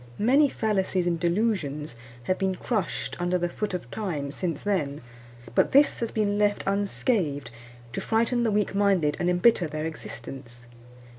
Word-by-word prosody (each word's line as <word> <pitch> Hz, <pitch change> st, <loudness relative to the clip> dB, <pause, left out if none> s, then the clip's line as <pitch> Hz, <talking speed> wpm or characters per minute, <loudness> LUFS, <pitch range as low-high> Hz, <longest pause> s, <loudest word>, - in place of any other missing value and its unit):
Many 275 Hz, +7 st, +4 dB
fallacies 195 Hz, -6 st, 0 dB
and 170 Hz, -1 st, 0 dB
delusions 170 Hz, -, 0 dB, 0.3 s
have 185 Hz, +9 st, -1 dB
been 190 Hz, -1 st, 0 dB
crushed 210 Hz, -1 st, -2 dB
under 175 Hz, +1 st, +1 dB
the 175 Hz, 0 st, 0 dB
foot 195 Hz, +2 st, -3 dB
of 120 Hz, -9 st, -7 dB
Time 155 Hz, -10 st, -3 dB
since 165 Hz, -1 st, -3 dB
then; 150 Hz, -9 st, -1 dB, 0.5 s
but -, -, +2 dB
this 285 Hz, +2 st, +5 dB
has 230 Hz, -, -1 dB
been 205 Hz, -1 st, 0 dB
left 205 Hz, 0 st, +2 dB
unscathed, 195 Hz, -, 0 dB, 0.4 s
to -, -, -3 dB
frighten 235 Hz, +2 st, +1 dB
the 235 Hz, -, +2 dB
weak 210 Hz, -1 st, +1 dB
minded 195 Hz, -7 st, +2 dB
and 175 Hz, -, +1 dB
embitter 180 Hz, 0 st, +4 dB
their 155 Hz, +1 st, -4 dB
existence. 130 Hz, -6 st, -8 dB
185 Hz, 155 wpm, -26 LUFS, 155-210 Hz, 0.5 s, this